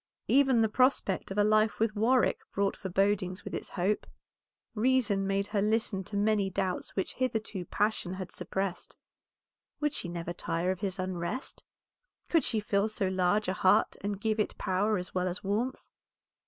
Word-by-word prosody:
Even 265 -3 +4
the 220 - +4
prospect 255 -4 +1
of 195 - -5
a 205 - +5
life 215 +1 +3
with 220 -1 +1
Warwick 240 +4 +3 0.2
brought 200 0 +1
forebodings 190 0 0
with - - -7
its - - -4
hope. 195 +3 -1 0.7
Reason 220 -4 +2
made 195 0 +1
her 205 0 -1
listen 215 -2 0
to 200 - -4
many 205 -1 +2
doubts 190 -1 -2
which 190 - -1
hitherto 220 -7 -2
passion 205 -3 -1
had 185 -1 -6
suppressed. 190 -2 -4 0.8
Would 295 0 0
she 175 - -4
never 170 0 -4
tire 175 +1 -1
of 190 - -4
his 195 -2 -2
unrest? 185 +6 -4 0.7
Could 330 -3 +3
she 225 - +1
fill 205 0 +1
so 200 -3 0
large 190 +3 +1
a 185 - +1
heart 185 0 +3
and 200 -1 -2
give 220 +1 0
it 210 - -1
power 205 +3 +1
as 180 0 -5
well 185 0 0
as 180 +2 -4
warmth? 220 +7 -2
200 Hz, 170 wpm, -30 LUFS, 185-220 Hz, 0.8 s, a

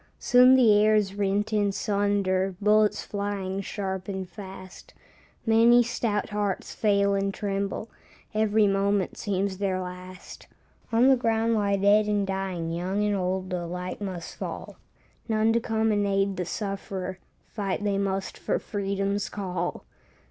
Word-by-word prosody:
Soon 250 +1 +6
the 240 -5 +6
air 215 0 +4
is 200 -2 +1
rent 205 +1 -1
in 205 -1 +2
sunder, 195 -2 0
Bullets 210 0 +3
flying 200 -1 -3
sharp 190 -2 -4
and 190 -2 -4
fast, 190 -1 -11 0.5
Many 230 +2 +6
stout 225 -3 -2
hearts 205 -2 -2
fail 200 -2 +2
and 195 0 0
tremble, 200 +1 -3 0.5
Every 215 0 +3
moment 195 -1 +1
seems 195 -1 -2
their 190 -2 0
last. 185 0 -9 0.4
On 230 +3 +4
the 270 - +7
ground 230 -1 +1
lie 200 -2 +1
dead 205 +2 +4
and 205 -1 +1
dying, 190 -4 -3
Young 185 +5 -1
and 210 -1 +1
old 185 0 -2
alike 180 +2 -4
must 185 -4 -5
fall; - - -7 0.5
None 220 0 +2
to 235 - +3
come 225 -1 0
and 205 -1 +1
aid 195 0 +1
the 180 - -3
sufferer, 190 -1 -4 0.3
Fight 200 -2 -2
they 200 -1 0
must 195 -1 -2
for - - 0
freedom's 200 0 -2
call. 180 -3 -4
200 Hz, 145 wpm, -26 LUFS, 190-210 Hz, 0.5 s, the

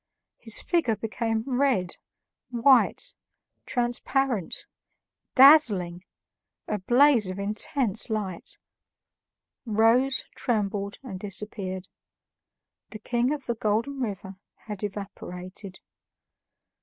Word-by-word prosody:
His 225 -2 +1
figure 330 -11 +1
became 225 +1 -2
red, 250 -9 0 0.5
white, 265 - +3 0.5
transparent, 245 - -1 0.7
dazzling, 210 - +6 0.6
a 210 - -2
blaze 240 0 +4
of 185 - -5
intense 210 +3 0
light, 200 -5 -4 1.1
rose, 235 +4 +2
trembled, 200 -3 -2
and 190 -8 -7
disappeared. 195 -2 -4 1.0
The 215 - -8
King 240 +4 0
of 295 -3 -4
the 235 - -1
Golden 230 +5 -1
River 195 -5 -5 0.3
had 210 -2 -7
evaporated. 195 -1 -7
220 Hz, 85 wpm, -26 LUFS, 195-250 Hz, 1.1 s, dazzling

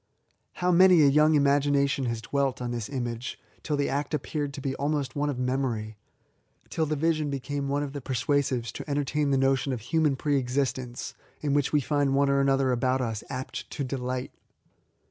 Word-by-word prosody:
How 180 0 0
many 180 -2 +7
a - - +6
young 150 +2 +4
imagination 140 -1 +2
has 115 -1 -3
dwelt 140 -1 0
on 120 -1 -3
this 120 -3 -4
image 120 -3 -4 0.2
till 150 -2 -2
the 140 - +1
act 145 +2 -1
appeared 145 0 -3
to - - -6
be 135 0 -2
almost 140 -3 -1
one 145 0 0
of 140 - -3
memory, 125 -4 -1 0.4
— - - -38
till 160 -1 0
the 155 - 0
vision 155 0 +1
became 140 +1 -3
one 145 +1 0
of 140 -1 -5
the 145 - -5
per 130 +1 -4
suasives 125 -2 0
to 150 - -8
entertain 145 +1 0
the 135 - +3
notion 135 0 +2
of 125 -3 -3
human 150 +4 +1
pre 145 +1 0
LIFE 130 -2 -2
TO 125 - -5
THE 140 - +2
INVALID. 140 - +4
65 130 +1 -5
^ - - -10
existence, 120 - -7 0.3
in 145 -2 0
which 145 -1 +1
we 150 - +3
find 140 0 +1
one 140 0 +3
or 140 - +3
another 135 -1 +2
about 130 +1 +1
lis 115 -3 -3
apt 130 -1 -5
to 145 - -4
delight 130 -1 -3
140 Hz, 225 wpm, -27 LUFS, 130-145 Hz, 0.4 s, many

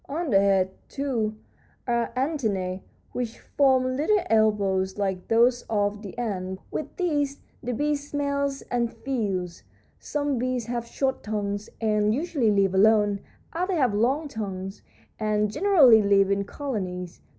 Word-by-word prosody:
"On 310 0 -2
the 195 - +6
head, 195 -1 +3 0.2
too, 235 -6 -2 0.5
are 235 -1 0
antennæ, 215 - -1 0.3
which 240 -2 -4
form 260 -2 +2
little 315 +10 +2
elbows, 200 -4 +2
like 190 -3 -2
those 240 +2 +3
of 205 -1 0
the 200 -1 -9
ant. 190 -5 -3
With 295 -2 -5
these 290 -6 0 0.2
the 250 - -3
bee 295 +5 +1
smells 280 -1 -2
and 235 -1 0
feels. 205 -8 -3 0.4
Some 290 -3 -2
bees 250 -1 -1
have 235 0 -3
short 265 +2 -1
tongues, 205 -1 -3
and 210 -1 +2
usually 285 -6 0
live 200 -2 +2
alone; 205 0 +4 0.3
others 360 +2 -1
have 255 -8 +2
long 260 +9 +1
tongues, 195 -5 -5 0.4
and 210 -1 +1
generally 280 - +6
live 200 -1 +3
in 200 0 +1
colonies. 185 - -5
225 Hz, 140 wpm, -26 LUFS, 200-275 Hz, 0.5 s, the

